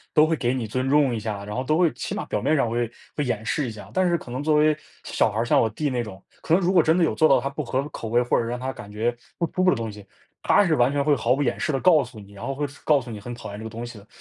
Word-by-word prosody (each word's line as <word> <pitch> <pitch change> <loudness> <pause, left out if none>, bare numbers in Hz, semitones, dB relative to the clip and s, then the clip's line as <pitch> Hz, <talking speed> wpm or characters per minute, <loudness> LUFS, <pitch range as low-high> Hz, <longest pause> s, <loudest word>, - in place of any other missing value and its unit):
都 155 - +6
会 165 - +1
给 125 -5 0
你 125 -3 -2
尊 130 +4 -2
重 140 -4 +4
一 - - -2
下， 105 -2 -4
然 105 +1 -6
后 130 - -1
都 155 +5 +1
会 170 -3 +3
起 - - -5
码 - - -3
表 - - -2
面 155 - +2
上 135 - +2
会 120 0 -1 0.3
会 150 - 0
掩 115 -4 -2
饰 145 -5 0
一 - - -4
下， 110 -2 -10
但 185 -1 +3
是 170 -1 +2
可 125 - -11
能 130 +3 -3
作 155 +1 +2
为 155 0 +4 0.3
小 - - +1
孩 105 - -4
儿， - - +1
像 120 - +3
我 110 - +2
弟 145 +6 -2
那 125 -2 -1
种， 100 -4 -10 0.2
可 - - -2
能 180 - +4
如 180 +2 +2
果 175 -3 +6
真 160 +3 +3
的 175 - +4
有 - - +1
做 155 - +4
到 135 -2 +5
他 135 - -2
不 140 +2 -5
合 135 +3 -2
口 115 - -6
味， 120 +2 +3
或 125 - +1
者 - - +2
是 - - -4
让 125 - -3
他 130 +1 -3
感 115 -6 -10
觉 115 +3 -1 0.2
不 170 - +1
舒 185 - +1
服 185 - +6
的 - - +1
东 115 -1 -3
西， 105 -1 -11 0.4
他 205 - +4
是 165 - +3
完 125 -2 +3
全 145 0 +1
会 150 0 +4
毫 125 0 +1
不 145 - 0
掩 135 - 0
饰 - - -1
地 135 - +1
告 165 -5 +5
诉 125 -3 -10
你， 100 -1 -13
然 100 +2 -9
后 135 - -2
会 145 +2 -2
是 140 +1 -15
告 150 -2 +4
诉 120 - -9
你 105 -2 -7
很 120 +4 -7
讨 120 -3 -8
厌 100 - -7
这 - - -8
个 110 - -6
东 115 +2 -6
西 120 -1 -10
的。 100 - -16
130 Hz, 390 characters per minute, -24 LUFS, 115-150 Hz, 0.4 s, 都